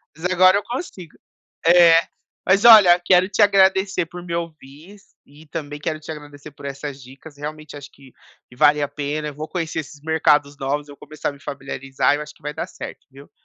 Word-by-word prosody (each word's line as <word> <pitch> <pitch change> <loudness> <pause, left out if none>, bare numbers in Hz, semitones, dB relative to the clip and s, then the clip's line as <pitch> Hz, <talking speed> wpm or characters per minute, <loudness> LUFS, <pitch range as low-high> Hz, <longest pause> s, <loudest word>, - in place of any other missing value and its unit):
Mas 160 +3 -9
agora 185 +1 +4
eu 205 - -3
consigo. 200 - -8 0.5
É. 170 -1 +7 0.4
Mas 195 +4 +2
olha, 205 -7 +8
quero 185 +1 +4
te 205 +2 -3
agradecer 190 -2 +3
por 180 +1 -10
me 170 -1 -5
ouvir 165 +3 -9
e 150 +3 -18
também 150 -2 -7
quero 155 +1 -4
te 155 - -10
agradecer 145 -1 -10
por 140 0 -12
essas 140 0 -7
dicas, 135 +4 -14
realmente 150 0 -8
acho 145 - -10
que 135 -2 -19 0.4
vale 150 0 +4
a 145 - -1
pena, 150 +1 -4
eu 145 - -8
vou 155 +2 -6
conhecer 165 -3 -4
esses 145 -1 -8
mercados 150 -2 +1
novos, 145 +2 -3
eu 145 - -11
vou - - -27
começar 155 - -5
a - - -3
me 140 - -16
familiarizar, 135 0 -2
eu - - -6
acho 150 0 -11
que - - -27
vai 150 0 -5
dar - - -5
certo, - - -10
viu. 140 +1 -16
155 Hz, 205 wpm, -21 LUFS, 145-175 Hz, 0.5 s, olha